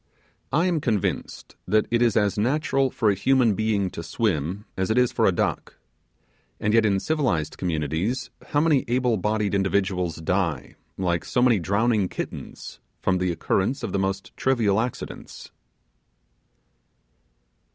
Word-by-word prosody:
I 165 Hz, +6 st, +2 dB
am 175 Hz, -4 st, +1 dB
convinced 110 Hz, -, -2 dB
that 110 Hz, 0 st, +3 dB
it 120 Hz, 0 st, +2 dB
is 115 Hz, -3 st, +3 dB
as 105 Hz, -2 st, +2 dB
natural 135 Hz, +4 st, +1 dB
for 110 Hz, -4 st, +1 dB
a -, -, +2 dB
human 120 Hz, +3 st, +3 dB
being 100 Hz, -3 st, 0 dB
to -, -, -6 dB
swim 90 Hz, +1 st, -2 dB
as 95 Hz, +1 st, -1 dB
it 110 Hz, -, +1 dB
is 125 Hz, -1 st, +4 dB
for -, -, +2 dB
a -, -, +5 dB
duck. -, -, -2 dB, 0.8 s
And 105 Hz, +1 st, 0 dB
yet 115 Hz, -1 st, +5 dB
in 100 Hz, -1 st, +2 dB
civilized 120 Hz, -, 0 dB
communities 85 Hz, -, -2 dB, 0.2 s
how 145 Hz, -, +1 dB
many 155 Hz, -4 st, +3 dB
able 125 Hz, -1 st, +1 dB
bodied 105 Hz, +1 st, 0 dB
individuals 95 Hz, -3 st, 0 dB
die, 85 Hz, -3 st, -1 dB, 0.2 s
like 90 Hz, -3 st, 0 dB
so -, -, -1 dB
many 120 Hz, -5 st, +4 dB
drowning 100 Hz, +2 st, +1 dB
kittens, -, -, -7 dB, 0.2 s
from 90 Hz, 0 st, +1 dB
the 90 Hz, -1 st, 0 dB
occurrence 100 Hz, -, -1 dB
of 110 Hz, -, -3 dB
the 100 Hz, -, 0 dB
most 95 Hz, 0 st, -3 dB
trivial 115 Hz, -6 st, +2 dB
accidents! 120 Hz, 0 st, -7 dB
105 Hz, 150 wpm, -24 LUFS, 95-120 Hz, 0.8 s, a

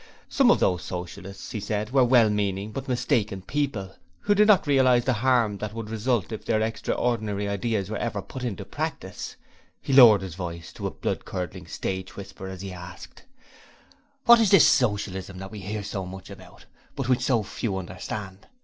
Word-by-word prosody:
Some 270 Hz, -3 st, +4 dB
of -, -, +5 dB
those 90 Hz, -3 st, +2 dB
Socialists, 90 Hz, +3 st, -7 dB
he 110 Hz, -, -3 dB
said, 105 Hz, +2 st, -3 dB
were 135 Hz, -1 st, +5 dB
well 120 Hz, -2 st, +5 dB
meaning 100 Hz, 0 st, -1 dB
but 135 Hz, -, -6 dB
mistaken 105 Hz, -6 st, 0 dB
people, 110 Hz, -7 st, -2 dB, 0.3 s
who 205 Hz, -, +3 dB
did 210 Hz, +1 st, +4 dB
not 210 Hz, -4 st, +5 dB
realize 130 Hz, -4 st, +4 dB
the 130 Hz, -, +2 dB
harm 115 Hz, -3 st, +2 dB
that 105 Hz, 0 st, -5 dB
would 110 Hz, -1 st, -6 dB
result 115 Hz, -1 st, 0 dB
if 110 Hz, -, -5 dB
their 110 Hz, -2 st, +1 dB
extraordinary 110 Hz, -2 st, -1 dB
ideas 100 Hz, 0 st, -1 dB
were 110 Hz, 0 st, -4 dB
ever 115 Hz, -2 st, -2 dB
put 130 Hz, -, -8 dB
into 105 Hz, -5 st, -4 dB
practice. 140 Hz, -, -5 dB, 0.4 s
He 135 Hz, -, -3 dB
lowered 115 Hz, -7 st, +8 dB
his 95 Hz, -3 st, -6 dB
voice 85 Hz, -2 st, -6 dB
to -, -, -4 dB
a -, -, -2 dB
blood -, -, -3 dB
curdling 90 Hz, -1 st, -6 dB
stage 95 Hz, +2 st, -4 dB
whisper 95 Hz, -1 st, -8 dB
as 95 Hz, -1 st, -7 dB
he 95 Hz, -1 st, -6 dB
asked: 90 Hz, +1 st, -11 dB, 1.0 s
'What 235 Hz, -1 st, +8 dB
is 220 Hz, -3 st, +4 dB
this 195 Hz, -7 st, +7 dB
Socialism 100 Hz, -5 st, 0 dB
that 95 Hz, +1 st, -8 dB
we 105 Hz, -, -7 dB
hear 105 Hz, +2 st, -4 dB
so 95 Hz, -2 st, -4 dB
much 95 Hz, +1 st, -9 dB
about, -, -, -13 dB, 0.3 s
but 135 Hz, -3 st, -3 dB
which 125 Hz, -1 st, +2 dB
so 120 Hz, -5 st, +2 dB
few 100 Hz, 0 st, -3 dB
understand? 95 Hz, +2 st, -7 dB
105 Hz, 185 wpm, -25 LUFS, 95-125 Hz, 1.0 s, lowered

